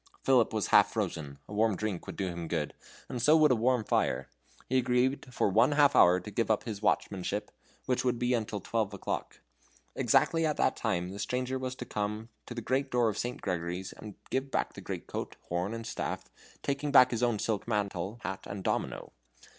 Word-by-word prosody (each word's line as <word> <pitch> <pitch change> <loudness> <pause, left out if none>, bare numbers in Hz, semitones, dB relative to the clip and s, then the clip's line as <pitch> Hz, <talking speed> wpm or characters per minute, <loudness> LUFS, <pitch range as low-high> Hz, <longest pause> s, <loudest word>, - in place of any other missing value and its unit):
Philip 125 -4 +4
was 110 -3 -1
half - - +7
frozen; 70 -3 -3
a - - -9
warm 110 0 +2
drink 105 -3 -3
would - - -6
do 95 - -2
him 85 -2 -4
good, 80 -2 -2 0.3
and 125 - -4
so 150 +6 +6
would 155 -3 +5
a - - +5
warm 120 +1 +2
fire. - - 0 0.4
He 130 +1 +3
agreed 125 +2 +1
for 120 - +1
one 115 +8 +4
half 145 -1 +5
hour 90 +1 +7
to 100 +4 -9
give 115 +2 0
up 110 - +2
his 105 -4 -5
watchmanship, 100 -1 -1 0.3
which 125 - 0
would 125 -1 +1
be 125 +1 0 0.2
till 105 -2 -5
twelve 105 -1 -1
o'clock. - - -4 0.5
Exactly 165 0 +3
at 155 -2 +1
that - - +2
time 90 +1 -1
the 100 - -7
stranger 130 +3 -1
was 130 0 -3
to 125 - -7
come 105 +1 -3 0.2
to 120 - -7
the 120 - -3
great 135 +3 0
door 120 -3 +3
of 105 - -4
St. 120 +1 -3
Gregory's 90 0 -3
and 105 -2 -10 0.2
give 135 +1 -1
back - - -1
the - - -9
great - - -5
coat, - - -5
horn, 90 +3 -1
and 115 0 -5
staff, - - -4 0.3
taking 140 +1 -1
back 130 -3 +7
his 120 -1 -1
own 120 -3 +2
silk 105 0 -2
mantle, 100 -1 -2
hat, 95 0 -5
and 100 -1 -6
domino. - - -2
110 Hz, 210 wpm, -30 LUFS, 100-125 Hz, 0.5 s, half